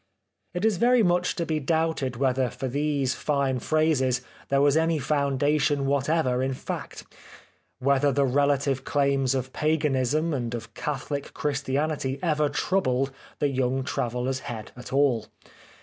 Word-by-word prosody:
It 180 +4 0
is 220 -4 +2
very 240 +3 +4
much 180 -1 +2
to 170 -3 -2
be 155 -1 -1
doubted 160 -3 0
whether 130 0 +1
for 130 - -5
these 140 0 0
fine 140 -3 0
phrases 135 -4 +1 0.3
there 140 - +3
was 140 0 +4
any 160 0 +2
foundation 145 +1 +1
whatever 140 -2 +1
in 130 0 -1
fact; - - -6 0.7
whether 140 +2 +2
the 140 +1 +2
relative 140 0 +1
claims 140 -2 +1
of 130 0 -3
Paganism 150 0 +1
and 120 -3 -2
of 115 -1 -8
Catholic 140 +1 -4
Christianity 140 -1 -1
ever 150 -3 +2
troubled 135 -9 0 0.3
the 145 - +1
young 130 0 0
traveller's 125 +1 -2
head 115 -4 -7
at 125 0 -10
all. 135 -5 +2
140 Hz, 140 wpm, -26 LUFS, 130-150 Hz, 0.7 s, very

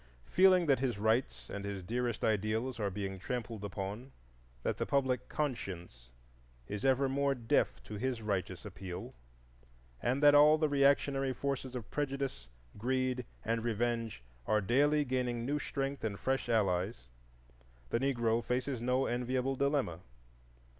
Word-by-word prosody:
Feeling 185 -1 +5
that 140 -4 +3
his 125 -5 0
rights 105 - 0
and 100 - -5
his 100 -2 -4
dearest 120 +4 -2
ideals 110 +4 0
are 105 -2 0
being 95 0 -4
trampled 115 0 -4
upon, 100 +6 -5 0.5
that - - -1
the - - 0
public 130 -2 +1
conscience 90 - -4 0.6
is 105 +3 -5
ever 135 0 +3
more 140 +1 +1
deaf 115 -3 +1
to 105 - -7
his 125 +2 -1
righteous 100 -5 -3
appeal, 90 -2 -7 0.9
and 130 +4 0
that 145 0 +8
all 150 +1 +7
the 155 0 +2
reactionary 140 -1 +3
forces 135 -1 -3
of 120 -4 -6
prejudice, 135 - -2 0.3
greed, 130 +1 0 0.2
and 115 +1 0
revenge 115 - -1 0.2
are 110 - +3
daily 145 +8 +3
gaining 125 -2 -1
new 145 +3 0
strength 140 -1 -3
and 100 -3 -2
fresh 135 -2 -1
allies, 95 - +1 0.9
the - - +2
Negro 120 -3 +1
faces 125 0 -1
no 125 +2 +2
enviable 125 +2 0
dilemma. 140 - 0
125 Hz, 140 wpm, -33 LUFS, 105-135 Hz, 0.9 s, that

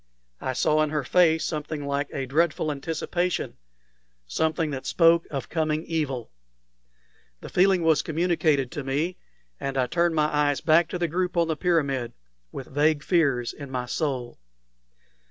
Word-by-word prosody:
I 130 - -2
saw 155 +4 +2
in 155 - +1
her 150 -1 -1
face 160 +2 +3
something 150 -1 -4
like 140 0 -1
a 135 - -3
dreadful 155 +2 +1
anticipation 165 +5 -2 0.7
something 160 - -1
that 130 -2 -5
spoke 165 -1 +4
of 135 -3 -4
coming 155 -1 -1
evil. 140 - -3 1.1
The - - -8
feeling 185 -1 +3
was 160 -3 +4
communicated 160 -5 +1
to 145 - -5
me, 150 +7 -2 0.4
and 135 0 -3
I 130 - +3
turned 170 +5 +1
my 155 -1 +3
eyes 145 -2 +1
back 165 +1 +4
to 180 - -4
the 175 -1 0
group 180 +2 -2
on 170 -1 +2
the 160 - 0
pyramid 140 -8 0 0.4
with 135 - -7
vague 150 +2 +1
fears 140 -9 +1
in 140 -2 -9
my 125 -1 -3
soul. 130 - -3
155 Hz, 155 wpm, -25 LUFS, 135-165 Hz, 1.1 s, spoke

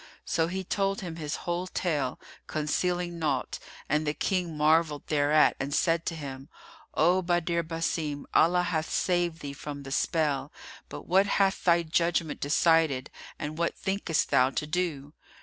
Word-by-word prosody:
So 165 0 +1
he 190 +2 -3
told 195 +3 -1
him 170 -3 -6
his 150 -3 -3
whole 175 +1 -2
tale, 150 -9 -1 0.3
concealing 175 +3 -1
naught; 145 -5 -1 0.3
and 150 +1 0
the 150 - 0
King 180 -5 -1
marvelled 155 0 +2
thereat 150 0 +3
and 140 +2 -2
said 165 0 +1
to 165 - -1
him, 135 -3 -7 0.5
"O 175 +4 +4
Badr 175 -1 0
Basim, 160 -3 -3
Allah 180 +2 +4
hath 160 -2 -1
saved 175 -2 0
thee 140 -1 -5
from 145 0 -7
the 135 - -8
spell: 145 -3 0 0.4
but - - -8
what 190 +3 +3
hath 195 -1 +1
thy 170 -1 +4
judgment 170 -1 0
decided 145 -2 +2 0.3
and 155 +2 -5
what 170 - 0
thinkest 190 -4 -1
thou 130 +1 +5
to 145 - -3
do?" 155 -3 -2
165 Hz, 155 wpm, -28 LUFS, 150-175 Hz, 0.5 s, thou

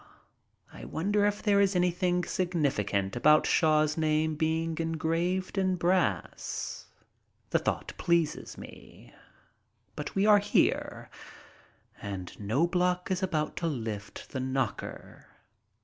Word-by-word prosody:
I - - -10
wonder 205 +5 +1
if 205 0 -2
there 200 -2 +4
is 195 -1 +2
anything 180 0 +1
significant 130 - -1
about 150 +5 +5
Shaw's 155 -1 +3
name 155 0 +1
being 160 +1 -1
engraved 165 +4 -1
in 185 -1 +1
brass. 170 - -1 0.6
The - - +3
thought - - -2
pleases 170 -3 0
me. - - -13 0.8
But - - -6
we 195 +1 +2
are 210 -1 +7
here, 205 +1 0 0.9
and 95 -3 -6
Knobloch 180 - 0
is 185 - 0
about 155 -5 -1
to 170 - -1
lift 110 -8 -5
the 130 - -3
knocker. 130 -3 -4
165 Hz, 115 wpm, -29 LUFS, 145-180 Hz, 0.9 s, are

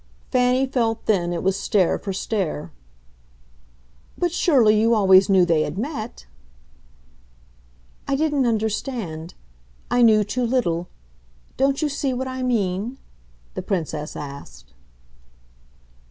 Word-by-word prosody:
Fanny 250 +1 +3
felt 235 -4 -1
then 175 -5 +1
it 170 - -3
was 190 0 +1
stare 190 -5 +1
for 195 - -5
stare. 185 - -3 1.5
"But 350 -1 0
surely 240 - +4
you 230 +1 +3
always 190 -2 +5
knew 190 -2 +5
they 165 -3 +2
had 155 +3 -3
met." 225 - -5 1.8
"I 275 - +1
didn't 290 -3 +1
understand. 215 - -3 0.6
I 245 0 +3
knew 215 -3 +6
too 245 +5 -2
little. 200 -9 0 0.7
Don't 275 +3 +1
you - - +2
see 280 -2 -2
what 260 +1 -3
I 260 0 -5
mean?" 225 -1 -1 0.6
the - - -4
Princess 160 -5 -3
asked. 65 - -10
215 Hz, 120 wpm, -22 LUFS, 180-255 Hz, 1.8 s, knew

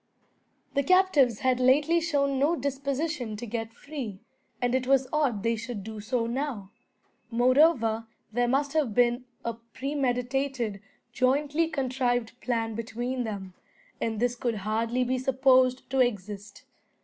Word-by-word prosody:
The 280 - +2
captives 295 - +4
had 255 -1 +2
lately 295 +7 +4
shown 280 -5 +1
no 300 +5 +3
disposition 275 -3 -2
to 240 - -6
get 225 0 -4
free, 245 -5 -7 0.4
and 245 0 0
it 260 -1 0
was 265 -1 +3
odd 265 -9 +1
they 230 0 +2
should 230 -2 -6
do 220 +1 -7
so 230 +2 -1
now. 235 -5 -3 0.6
Moreover 240 -2 +3 0.3
there 245 +1 +2
must 275 +3 +1
have 285 -9 +1
been 245 +1 +3 0.2
a 230 - -1
premeditated, 250 -2 -2 0.3
jointly 290 +6 +2
contrived 250 -5 -1
plan 230 -2 -1
between 240 +3 -3
them, 195 -4 -6 0.5
and 220 -2 -1
this 245 +1 +1
could 240 -2 -1
hardly 230 +3 0
be 255 +1 0
supposed 260 0 +3
to 270 - +1
exist. 205 -4 -2
250 Hz, 135 wpm, -28 LUFS, 230-275 Hz, 0.6 s, captives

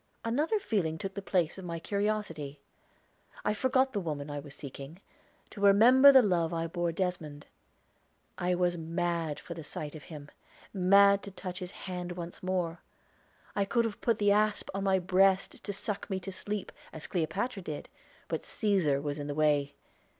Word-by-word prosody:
Another 295 - +1
feeling 195 - -1
took 195 +3 -5
the 200 - -5
place 180 -2 0
of 190 - -8
my 170 -1 -4
curiosity. 185 -7 -2 0.9
I - - +2
forgot 260 +4 +2
the 205 - 0
woman 150 -5 -4
I 145 - -3
was 145 -1 -11
seeking, 140 +4 -9 0.5
to 200 - -9
remember 240 +8 +8
the 265 -2 +7
love 175 -5 +1
I 165 0 -1
bore 175 0 -1
Desmond. 165 -5 -3 0.9
I 180 0 0
was 175 -1 +1
mad 165 -1 -2
for 170 - -8
the 165 -1 -8
sight 150 0 -6
of 155 -4 -10
him 150 -2 -10 0.4
mad 200 +1 +5
to - - -8
touch 185 -1 -7
his 180 -1 -6
hand 180 -2 -4
once 175 -1 -7
more. 180 -2 -1 0.8
I 200 - +2
could 230 +4 +1
have 220 -3 -4
put 230 -3 +2
the 205 -1 +3
asp 210 +1 +1
on 195 0 -2
my 190 -1 +4
breast 190 +1 +2
to 205 - -3
suck 200 +1 -4
me 190 -1 -1
to 195 - -6
sleep, 205 +2 -4 0.2
as 160 - -7
Cleopatra 195 +6 -2
did; 155 -4 -6 0.4
but - - -2
Cæsar 175 -10 +1
was 145 0 -3
in 145 - -4
the 145 - -3
way. 145 -2 +2
180 Hz, 180 wpm, -30 LUFS, 160-200 Hz, 0.9 s, remember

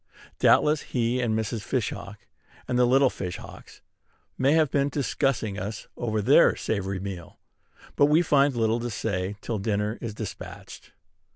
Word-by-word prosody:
Doubtless 150 0 +4
he 125 0 -1
and 110 -2 0
Mrs. 110 0 -2
Fish 120 +1 -1
hawk, 100 +1 -9 0.4
and 125 -1 0
the 125 - +5
little 135 +1 +4
Fish 90 -2 -5
hawks, - - -13 0.5
may 135 +3 +2
have 160 -3 +3
been 140 0 +1
discussing 135 -7 -1
us 105 +3 -6
over 110 -3 -2
their 140 +9 +5
savory 100 -3 -2
meal; 95 -3 -7 0.6
but 145 - +5
we 155 +4 +4
find 140 -4 +3
little 115 0 +1
to 120 +1 -3
say 100 -2 -3
till 110 -3 -3
dinner 105 +1 -1
is 115 -3 -5
despatched. 110 -3 -9
115 Hz, 160 wpm, -26 LUFS, 105-135 Hz, 0.6 s, the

